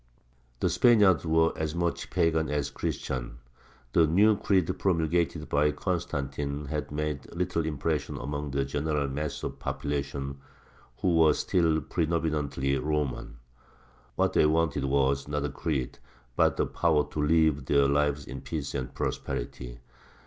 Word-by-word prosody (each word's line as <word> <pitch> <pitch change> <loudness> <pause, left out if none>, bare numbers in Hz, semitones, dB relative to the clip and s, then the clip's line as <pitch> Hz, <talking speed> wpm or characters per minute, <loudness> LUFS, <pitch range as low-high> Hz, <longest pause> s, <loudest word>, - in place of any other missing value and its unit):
The - - +2
Spaniards 95 - +5
were 80 +1 +3
as 80 0 -3
much 85 0 -1
pagan 80 -1 +1
as 70 -1 -1
Christian; - - -4 0.6
the 80 -2 +5
new 105 +7 +5
creed 95 -3 +1
promulgated 85 -3 0
by 75 +1 +2
Constantine 70 -5 -3
had 75 -1 -4
made 75 -1 -3
little 85 -2 -1
impression 75 0 -2
among 70 +2 -4
the 70 0 0
general 75 +1 -1
mass 75 +2 -4
of - - -2
the - - -18
population, 70 -1 -3 0.6
who 90 -3 +2
were 80 -1 +6
still 80 -3 +1
predominantly 75 -4 -1
Roman. 75 -3 -2 0.8
What - - +1
they - - +5
wanted 80 -3 +1
was, 70 0 +1
not 75 0 -1
a - - -1
creed, 70 -2 -3 0.4
but - - +3
the - - +2
power 80 -3 +2
to 75 - -2
live 75 -2 +3
their 70 +1 +4
lives 70 0 +1
in 65 -1 -7
peace 70 +1 -4
and 65 - -4
prosperity. - - -4
75 Hz, 140 wpm, -28 LUFS, 70-80 Hz, 0.8 s, were